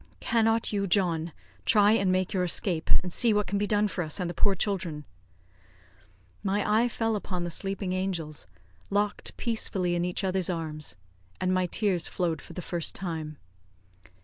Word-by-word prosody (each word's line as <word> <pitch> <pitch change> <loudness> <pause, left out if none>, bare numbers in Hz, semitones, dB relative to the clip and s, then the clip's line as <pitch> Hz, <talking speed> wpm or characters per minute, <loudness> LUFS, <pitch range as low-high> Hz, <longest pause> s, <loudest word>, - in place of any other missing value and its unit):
"Cannot 225 -1 +2
you, 200 -1 0
John, 170 -4 +1 0.3
try 205 - +5
and 195 -4 +3
make 185 +2 +1
your 185 -2 +1
escape, 175 -1 -1
and 180 -2 -5
see 230 -3 +4
what 210 0 +2
can 200 - -1
be 205 - +1
done 210 0 +3
for 185 -3 -2
us 155 +2 -2
and 180 - -1
the 175 - -3
poor 200 +3 +3
children?" 170 -7 -2 1.4
My 200 0 0
eye 220 +3 +4
fell 225 -1 0
upon 185 -3 -3
the 175 - -3
sleeping 195 +1 -2
angels, 175 -5 -2 0.4
locked 205 +1 -1
peacefully 195 -6 0
in 175 0 +1
each 180 +2 -1
other's 190 -1 +1
arms, 155 -3 -3 0.4
and 185 0 +1
my 185 -1 +2
tears 185 -2 +1
flowed 170 -4 -1
for - - -12
the 180 - -5
first 170 -2 -1
time. 160 -5 -4
185 Hz, 175 wpm, -28 LUFS, 175-205 Hz, 1.4 s, try